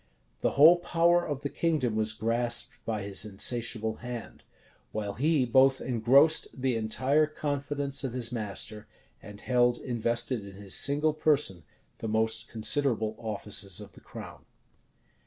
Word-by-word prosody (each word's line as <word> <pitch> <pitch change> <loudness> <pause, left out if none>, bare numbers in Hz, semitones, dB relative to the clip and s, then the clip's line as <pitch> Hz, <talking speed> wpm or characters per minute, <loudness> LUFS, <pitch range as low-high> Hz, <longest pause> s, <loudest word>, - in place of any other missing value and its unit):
The - - +2
whole 160 +5 +8
power 175 0 +2
of 145 -4 -4
the 140 - -2
kingdom 145 -10 -1
was 110 0 0
grasped 115 +2 0
by 110 -3 -3
his 100 0 0
insatiable 110 +1 0
hand; 120 -1 -8 0.5
while 105 -2 -4
he 145 +3 +1
both 130 +2 +4
engrossed 130 +6 +3
the 130 -1 0
entire 130 +7 +1
confidence 145 -2 -2
of 130 -3 -3
his 125 -2 -4
master, 105 -2 -4 0.3
and 105 -1 -11
held 120 0 +2
invested 120 -1 -1
in 100 -1 -11
his 100 -1 -5
single 150 +2 +3
person 145 - +1 0.4
the 115 - -4
most 110 +1 0
considerable 115 -1 0
offices 105 -4 -3
of - - -11
the - - -17
crown. - - -11
120 Hz, 140 wpm, -28 LUFS, 110-140 Hz, 0.5 s, whole